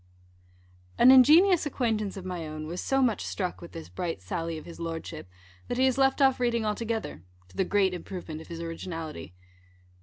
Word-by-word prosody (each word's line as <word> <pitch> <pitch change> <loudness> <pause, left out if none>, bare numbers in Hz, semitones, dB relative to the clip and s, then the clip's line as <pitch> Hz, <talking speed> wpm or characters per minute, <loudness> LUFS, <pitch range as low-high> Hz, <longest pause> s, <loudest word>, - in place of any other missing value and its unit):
_ - - -32 0.9
An 255 - +8
ingenious 315 +7 +6
acquaintance 220 -7 -1
of 190 - -7
my 175 -3 -4
own 155 0 -6
was 170 +3 -5
so 270 0 +1
much 235 -4 +1
struck 185 -3 -3
with 170 - -11
this 165 -1 -8
bright 175 - -4
sally 165 - -4
of 155 - -10
his 170 - -11
Lordship, 165 - -6 0.4
that 245 - -3
he 260 - +4
has 260 0 +1
left 270 +1 +3
off 265 -1 +4
reading 235 -2 +1
altogether, 220 - -3 0.3
to - - -19
the - - +2
great 195 -2 +2
improvement 175 -3 -7
of - - -13
his 165 -1 -7
originality. 165 - -6
185 Hz, 190 wpm, -28 LUFS, 165-245 Hz, 0.9 s, An